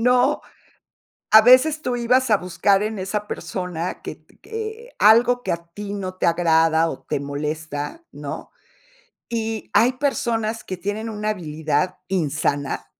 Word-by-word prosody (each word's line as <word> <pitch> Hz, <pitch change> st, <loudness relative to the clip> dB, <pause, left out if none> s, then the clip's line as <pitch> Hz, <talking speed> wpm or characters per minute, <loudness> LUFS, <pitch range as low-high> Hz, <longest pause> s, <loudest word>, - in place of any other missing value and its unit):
No, 250 Hz, +4 st, +3 dB, 0.9 s
a 220 Hz, -, +10 dB
veces 290 Hz, +6 st, +5 dB
tú 245 Hz, -1 st, -1 dB
ibas 250 Hz, +1 st, +2 dB
a 210 Hz, -, +6 dB
buscar 185 Hz, +2 st, +1 dB
en 215 Hz, -1 st, -3 dB
esa 205 Hz, +2 st, -3 dB
persona 180 Hz, -3 st, -4 dB
que -, -, -6 dB
t -, -, -28 dB
que 450 Hz, +2 st, -7 dB
algo 240 Hz, +3 st, +5 dB
que -, -, -1 dB
a 170 Hz, 0 st, -5 dB
ti 205 Hz, -1 st, -6 dB
no 185 Hz, -2 st, -4 dB
te 185 Hz, -, -1 dB
agrada 165 Hz, -1 st, +3 dB
o -, -, -8 dB
te 140 Hz, -, -2 dB
molesta, 150 Hz, -, -4 dB
¿no? -, -, -7 dB, 0.8 s
Y 225 Hz, -2 st, -3 dB
hay 235 Hz, +5 st, +5 dB
personas 235 Hz, -5 st, -1 dB
que 185 Hz, -, -5 dB
tienen 210 Hz, +4 st, -3 dB
una 210 Hz, 0 st, -2 dB
habilidad 160 Hz, -2 st, -1 dB
insana 145 Hz, -5 st, -1 dB
205 Hz, 150 wpm, -22 LUFS, 165-240 Hz, 0.9 s, a